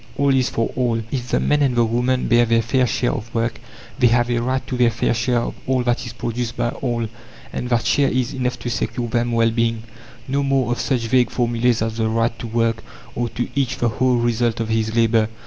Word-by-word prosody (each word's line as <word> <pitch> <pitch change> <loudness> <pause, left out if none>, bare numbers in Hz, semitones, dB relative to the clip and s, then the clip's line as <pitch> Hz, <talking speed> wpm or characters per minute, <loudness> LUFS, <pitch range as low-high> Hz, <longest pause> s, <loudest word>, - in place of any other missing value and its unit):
All 140 -1 +3
is 130 -2 +2
for 115 - -1
all! 120 -3 0
If 125 -2 -3
the - - +2
man 150 0 +2
and 135 -3 +2
the 120 -1 +4
woman 125 +3 0
bear 120 -1 +4
their 115 0 +3
fair 125 +2 +2
share 120 - 0
of 115 +3 -5
work, 115 0 -1 0.4
they 125 - +6
have 120 +1 +2
a 120 - +1
right 130 +2 -1
to 130 - -4
their 120 -1 +4
fair 115 +1 0
share 120 +2 0
of - - -3
all 130 -1 +1
that 120 +1 -1
is 115 - -7
produced 120 0 -4
by 120 - 0
all, 120 -2 -2 0.5
and 125 - -3
that 120 -2 +1
share 140 -1 +3
is 130 +2 -1
enough 125 -2 -2
to 120 - -3
secure 120 +2 -2
them 120 +1 0
well 115 0 +3
being. 115 -1 0 0.4
No 140 +2 0
more 135 -3 +1
of 120 - -1
such 130 -4 0
vague 125 0 +3
formulas 120 -1 +1
as 110 0 -3
"The 110 -1 +1
right 115 +1 +1
to 120 - -5
work," 115 0 0 0.3
or 120 -1 -2
"To 120 +2 -3
each 130 -2 0
the 120 - +1
whole 125 +3 +1
result 120 -1 0
of 115 -1 -2
his 110 0 0
labour." 115 -1 +3
120 Hz, 235 wpm, -21 LUFS, 115-125 Hz, 0.5 s, they